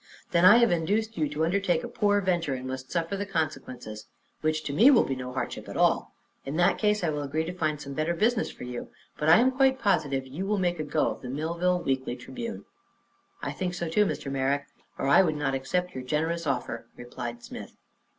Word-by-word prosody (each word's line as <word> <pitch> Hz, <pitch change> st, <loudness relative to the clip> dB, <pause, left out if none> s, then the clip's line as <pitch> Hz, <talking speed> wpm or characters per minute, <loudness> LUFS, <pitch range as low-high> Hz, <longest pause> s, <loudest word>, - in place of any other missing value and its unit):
"Then 175 Hz, 0 st, +4 dB
I 210 Hz, +5 st, +9 dB
have 235 Hz, -1 st, +4 dB
induced 210 Hz, +7 st, 0 dB
you 155 Hz, -3 st, 0 dB
to 150 Hz, +2 st, 0 dB
undertake 180 Hz, -1 st, +1 dB
a -, -, -4 dB
poor 205 Hz, -1 st, +2 dB
venture 175 Hz, -7 st, 0 dB
and 130 Hz, 0 st, -6 dB
must 130 Hz, 0 st, -6 dB
suffer 170 Hz, +2 st, -1 dB
the 200 Hz, -, -2 dB
consequences, 130 Hz, -, -4 dB, 0.3 s
which 155 Hz, 0 st, 0 dB
to 140 Hz, -, -4 dB
me 230 Hz, -, +7 dB
will 260 Hz, -5 st, +6 dB
be 135 Hz, -, -2 dB
no 125 Hz, 0 st, -6 dB
hardship 130 Hz, -, -4 dB
at -, -, -6 dB
all. -, -, +2 dB, 0.3 s
In 140 Hz, -, -5 dB
that 175 Hz, +2 st, +3 dB
case 210 Hz, -2 st, +2 dB
I 165 Hz, -, +1 dB
will 150 Hz, -1 st, -2 dB
agree 150 Hz, +3 st, -2 dB
to 175 Hz, -, -4 dB
find 155 Hz, -4 st, -1 dB
some 140 Hz, -2 st, -7 dB
better 155 Hz, +4 st, 0 dB
business 220 Hz, +5 st, +1 dB
for -, -, -10 dB
you, 125 Hz, -1 st, -6 dB, 0.3 s
but 150 Hz, -, +1 dB
I 160 Hz, -, +9 dB
am 250 Hz, +3 st, +4 dB
quite 265 Hz, 0 st, +3 dB
positive 155 Hz, -, +1 dB
you 155 Hz, +9 st, -5 dB
will 210 Hz, 0 st, +1 dB
make 175 Hz, -3 st, 0 dB
a -, -, -1 dB
go 150 Hz, +1 st, +1 dB
of -, -, -8 dB
the 125 Hz, -, -7 dB
Millville 170 Hz, +6 st, 0 dB
Weekly 130 Hz, -2 st, -1 dB
Tribune." 230 Hz, -, -7 dB, 0.8 s
"I -, -, -2 dB
think 180 Hz, -1 st, -3 dB
so, 170 Hz, -1 st, -3 dB
too, 205 Hz, +5 st, +3 dB
Mr. 135 Hz, -, -4 dB
Merrick, 140 Hz, +1 st, 0 dB, 0.3 s
or -, -, -2 dB
I 140 Hz, -, +7 dB
would 160 Hz, -5 st, +1 dB
not 145 Hz, -2 st, -1 dB
accept 180 Hz, +7 st, -1 dB
your 130 Hz, -, -5 dB
generous 160 Hz, +5 st, -1 dB
offer," 125 Hz, -3 st, -2 dB
replied 120 Hz, -1 st, -7 dB
Smith. -, -, -9 dB
160 Hz, 225 wpm, -27 LUFS, 135-185 Hz, 0.8 s, I